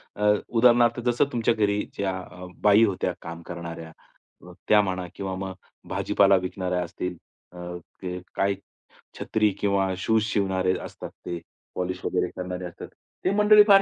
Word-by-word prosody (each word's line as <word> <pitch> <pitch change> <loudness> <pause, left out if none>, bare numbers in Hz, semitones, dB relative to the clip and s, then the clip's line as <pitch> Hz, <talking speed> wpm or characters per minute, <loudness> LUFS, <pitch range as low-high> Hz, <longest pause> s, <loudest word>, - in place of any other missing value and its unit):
अ, 105 0 +3 0.2
उदाहरणार्थ 120 0 +5
जसं 120 +3 +3
तुमच्या 115 -1 +2
घरी 105 -2 +1 0.2
ज्या 95 -1 0 0.5
बाई 105 +2 +7
होत्या 100 -4 -1
काम 85 0 -7
करणाऱ्या, 85 -1 -7 0.6
अ, - - -11 0.2
त्या 105 -1 +7
म्हणा 95 -2 -2
किंवा 95 -1 -4
मग 95 0 -4 0.4
भाजीपाला 100 -1 +4
विकणाऱ्या 90 -1 -2
असतील, 90 +1 -4 0.4
अ, 90 0 -6 0.2
ते 90 -1 -4 0.2
काही 100 0 +2 0.6
छत्री 110 -1 +2
किंवा 100 -2 +1
शूज 110 +3 +2
शिवणारे 95 -3 +1
असतात - - -8 0.2
ते, 85 -1 -3 0.4
पॉलिश 90 0 -3
वगैरे - - 0
करणारे 90 0 -4
असतात. 85 - -8 0.4
ते 185 - +3
मंडळी 210 0 +8
फार 195 -1 +8
95 Hz, 150 wpm, -26 LUFS, 90-110 Hz, 0.6 s, मंडळी